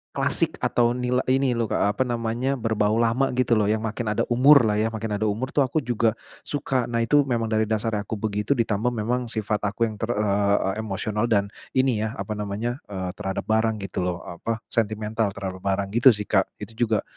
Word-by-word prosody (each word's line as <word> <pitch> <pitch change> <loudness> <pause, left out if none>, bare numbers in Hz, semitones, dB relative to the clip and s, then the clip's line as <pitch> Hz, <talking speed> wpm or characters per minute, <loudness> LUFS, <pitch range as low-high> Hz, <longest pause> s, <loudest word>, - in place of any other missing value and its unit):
klasik - - +1
atau 120 0 +2
nila 125 0 0
ini 130 0 +2
loh 115 -2 0
Kak 100 - +1
apa - - +5
namanya, 120 +3 -1
berbau 110 -3 0
lama 120 +3 +1
gitu 125 -1 0
loh 105 -3 +4
yang 110 +1 0
makin 110 -1 -2
ada - - +1
umur 135 +2 +7
lah 105 -1 +1
ya, 110 - +2
makin 110 -1 -4
ada 105 +1 0
umur 115 +6 -2
tuh - - 0
aku 140 +2 +1
juga 115 -1 +1 0.2
suka. 130 -4 -2
Nah 115 -1 0
itu 145 +3 +3
memang 115 -3 -1
dari 110 0 +2
dasarnya 110 -2 -1
aku 110 - -3
begitu 105 +5 -1
ditambah 115 +1 0
memang 120 +3 -1
sifat 110 -2 -2
aku 110 +3 -1
yang 110 -2 -2
ter 115 - -2
eee, 100 -1 +1
emosional 105 +1 -2
dan 100 -2 +1 0.2
ini 130 -4 +2
ya 110 +3 -2
apa 110 - -5
namanya, 105 +5 -3
eee, 95 -3 -4
terhadap 95 0 -4
barang 110 0 +1
gitu 95 - -4
loh, 90 -1 -3
apa 110 +6 -5
sentimental 110 -1 0
terhadap 95 -1 -5
barang 100 +1 -1
gitu 120 +1 +6
sih 105 - -3
Kak. 95 -2 +2 0.2
Itu - - -7 0.2
juga 110 -2 +1
110 Hz, 205 wpm, -24 LUFS, 105-120 Hz, 0.2 s, umur